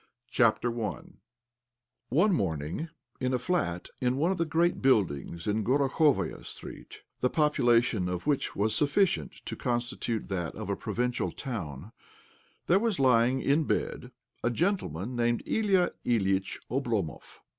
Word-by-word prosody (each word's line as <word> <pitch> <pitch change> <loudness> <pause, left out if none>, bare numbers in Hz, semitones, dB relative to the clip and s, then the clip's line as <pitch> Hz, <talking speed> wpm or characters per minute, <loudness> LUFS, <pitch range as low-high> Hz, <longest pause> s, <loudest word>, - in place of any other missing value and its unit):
OBLOMOV 120 - 0 1.0
One 180 - +3
morning, 80 - -2 0.3
in 130 0 0
a - - +2
flat 125 - -1
in 125 0 +1
one 165 +6 +2
of 190 - -2
the 165 - +2
great 170 +2 +1
buildings 85 - +1
in 105 +1 0
Gorokhovaia 135 - +2
Street,' - - -10 0.2
the 125 - +2
popu 150 -2 +1
lation 115 -6 +3
of 90 -1 -4
which 145 -2 0
was 105 +2 +1
sufficient 170 +6 +2
to - - -4
constitute 120 -2 -2
that 90 -5 -3
of - - -4
a - - 0
provincial 125 +1 -2
town, 95 - -6 0.7
there 180 +3 +4
was 225 -2 0
lying 130 -1 +3
in 150 +3 +3
bed 125 - -2 0.3
a - - +2
gentleman 125 - -1
named 120 0 +1
Ilya 195 -5 +2
Ilyitch 95 -5 +1
Oblomov. 115 - -2
125 Hz, 135 wpm, -29 LUFS, 105-150 Hz, 1.0 s, there